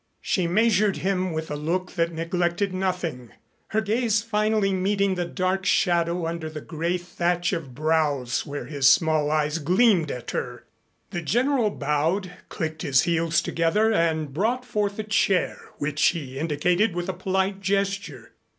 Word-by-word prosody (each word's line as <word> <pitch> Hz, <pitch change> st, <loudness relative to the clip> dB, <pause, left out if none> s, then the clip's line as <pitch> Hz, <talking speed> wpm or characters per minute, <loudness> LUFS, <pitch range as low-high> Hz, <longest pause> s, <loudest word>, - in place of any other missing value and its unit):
She 180 Hz, -3 st, 0 dB
measured 210 Hz, +1 st, +3 dB
him 185 Hz, -1 st, -1 dB
with 160 Hz, -1 st, -4 dB
a -, -, -2 dB
look 170 Hz, +5 st, -2 dB
that 170 Hz, -1 st, 0 dB
neglected 175 Hz, +3 st, -1 dB
nothing, 180 Hz, -, -3 dB, 0.3 s
her 220 Hz, -, 0 dB
gaze 220 Hz, 0 st, +1 dB
finally 215 Hz, -2 st, +1 dB
meeting 195 Hz, +1 st, +1 dB
the 180 Hz, -1 st, -2 dB
dark 185 Hz, +2 st, -1 dB
shadow 170 Hz, -2 st, +1 dB
under 165 Hz, -1 st, -4 dB
the 155 Hz, -1 st, -7 dB
gray 170 Hz, +4 st, -2 dB
thatch 175 Hz, +1 st, -1 dB
of 145 Hz, -8 st, -5 dB
brows 150 Hz, -4 st, 0 dB
where 145 Hz, 0 st, -6 dB
his 140 Hz, -3 st, +3 dB
small 155 Hz, -3 st, +3 dB
eyes 150 Hz, +1 st, 0 dB
gleamed 180 Hz, +1 st, +3 dB
at 125 Hz, -3 st, -5 dB
her. -, -, -4 dB, 0.5 s
The 175 Hz, -, -3 dB
General 240 Hz, -, +1 dB
bowed, 165 Hz, +4 st, -1 dB, 0.2 s
clicked 160 Hz, -1 st, -4 dB
his 135 Hz, -5 st, +3 dB
heels 165 Hz, -1 st, +1 dB
together 210 Hz, +7 st, +1 dB
and 160 Hz, -6 st, 0 dB
brought 235 Hz, -, 0 dB
forward 210 Hz, -4 st, -1 dB
a 215 Hz, -, -2 dB
chair, 205 Hz, -3 st, +1 dB, 0.2 s
which 145 Hz, +1 st, -1 dB
he 140 Hz, -6 st, -2 dB
indicated 175 Hz, +6 st, +1 dB
with 175 Hz, +1 st, -3 dB
a 190 Hz, -, -2 dB
polite 190 Hz, +2 st, -1 dB
gesture. 195 Hz, -, -2 dB
175 Hz, 155 wpm, -25 LUFS, 155-195 Hz, 0.5 s, measured